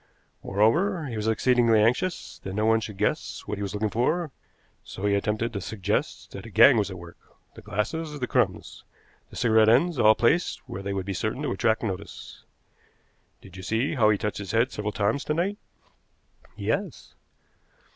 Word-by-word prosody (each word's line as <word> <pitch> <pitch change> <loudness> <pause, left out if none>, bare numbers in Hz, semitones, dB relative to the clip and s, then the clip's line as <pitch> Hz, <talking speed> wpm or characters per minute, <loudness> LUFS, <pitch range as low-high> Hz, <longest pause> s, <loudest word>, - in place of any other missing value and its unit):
Moreover, 160 - +1
he 125 -5 -5
was 105 0 -2
exceedingly 115 0 +3
anxious 125 +12 0
that 95 0 -5
no 105 +1 0
one 110 0 +4
should 105 -3 -7
guess - - -1
what 105 - -4
he - - -5
was 100 0 -4
looking 105 0 -1
for, 155 +7 0 0.5
so 95 - -7
he 100 - +2
attempted 105 +3 -1
to 100 - -4
suggest 100 -1 -3
that 100 +3 -9
a - - -10
gang 115 +4 +7
was 105 -2 +1
at 95 - -7
work 85 0 -12 0.3
the - - -12
glasses, 150 +9 -3
the 125 - -1
crumbs, 115 -8 -1 0.5
the - - -14
cigarette 110 -2 +4
ends, 145 +6 +3
all 110 -1 +6
placed 150 +9 +1
where 95 - -6
they 100 0 -4
would 95 -2 -3
be 100 - -3
certain - - -3
to - - -1
attract 110 +3 +1
notice. 100 -2 -6 1.0
Did 95 -1 -14
you - - -7
see 110 +8 -1
how 115 -7 +3
he 105 - +3
touched 105 +1 -3
his 100 +1 -6
head 115 +3 +2
several 105 0 -3
times 110 +7 0
to 150 - -1
night?" 195 +6 -1 1.0
"Yes." - - -3
110 Hz, 185 wpm, -26 LUFS, 100-125 Hz, 1.0 s, gang